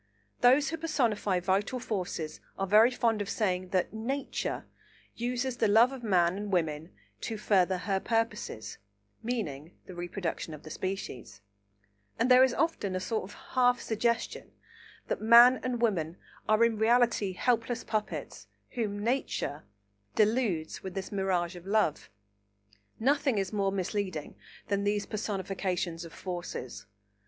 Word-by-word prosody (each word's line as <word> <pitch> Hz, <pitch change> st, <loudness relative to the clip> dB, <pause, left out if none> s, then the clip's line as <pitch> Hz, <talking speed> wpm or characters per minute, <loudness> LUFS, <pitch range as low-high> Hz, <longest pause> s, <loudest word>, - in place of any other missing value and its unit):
Those 265 Hz, +4 st, +5 dB
who 325 Hz, -, -3 dB
personify 235 Hz, -, 0 dB
vital 195 Hz, +7 st, 0 dB
forces 180 Hz, -9 st, -4 dB, 0.2 s
are 195 Hz, -, 0 dB
very 215 Hz, +5 st, +6 dB
fond 230 Hz, -4 st, +1 dB
of 200 Hz, -, -4 dB
saying 185 Hz, -4 st, -1 dB
that 185 Hz, +1 st, 0 dB
"Nature" 260 Hz, +6 st, -3 dB, 0.5 s
uses 245 Hz, +1 st, -2 dB
the 225 Hz, -, +3 dB
love 225 Hz, +5 st, +6 dB
of 265 Hz, -2 st, -7 dB
man 185 Hz, -5 st, +2 dB
and 205 Hz, 0 st, -4 dB
woman 160 Hz, -3 st, -1 dB, 0.3 s
"to 225 Hz, -, -4 dB
further 190 Hz, -3 st, +2 dB
her 195 Hz, +1 st, -1 dB
purposes" 210 Hz, -, -2 dB, 0.4 s
(meaning 180 Hz, -, -4 dB
the 185 Hz, -, -10 dB
reproduction 175 Hz, -2 st, -4 dB
of 150 Hz, -, -14 dB
the 155 Hz, -, -9 dB
species), 130 Hz, -, -5 dB, 0.8 s
and 235 Hz, +3 st, +2 dB
there 250 Hz, +1 st, +8 dB
is 260 Hz, -, +4 dB
often 265 Hz, -, 0 dB
a -, -, 0 dB
sort 215 Hz, +2 st, -2 dB
of 200 Hz, -, -12 dB, 0.2 s
half 245 Hz, -1 st, +4 dB
suggestion 230 Hz, +1 st, -1 dB, 0.6 s
that -, -, -2 dB
man 235 Hz, +3 st, +8 dB
and 245 Hz, -2 st, -2 dB
woman 175 Hz, -6 st, 0 dB, 0.3 s
are 215 Hz, +2 st, +5 dB
in 225 Hz, -2 st, 0 dB
reality 230 Hz, -3 st, +3 dB
helpless 235 Hz, +3 st, 0 dB
puppets 215 Hz, -1 st, -4 dB, 0.2 s
whom 205 Hz, -4 st, -3 dB
"Nature" 235 Hz, -, -1 dB, 0.5 s
deludes 215 Hz, -7 st, +1 dB
with 190 Hz, -2 st, -7 dB
the 195 Hz, +1 st, -5 dB
mirage 185 Hz, -2 st, 0 dB
of 175 Hz, +1 st, -11 dB
love. 205 Hz, -7 st, +1 dB, 0.9 s
Nothing 275 Hz, 0 st, +2 dB
is 195 Hz, +1 st, -1 dB
more 200 Hz, -2 st, +1 dB
misleading 190 Hz, -4 st, -3 dB, 0.3 s
than 200 Hz, 0 st, 0 dB
these 205 Hz, 0 st, 0 dB
personifications 190 Hz, -5 st, -3 dB
of 165 Hz, -, -9 dB
forces. 175 Hz, -, -6 dB
205 Hz, 140 wpm, -30 LUFS, 185-235 Hz, 0.9 s, there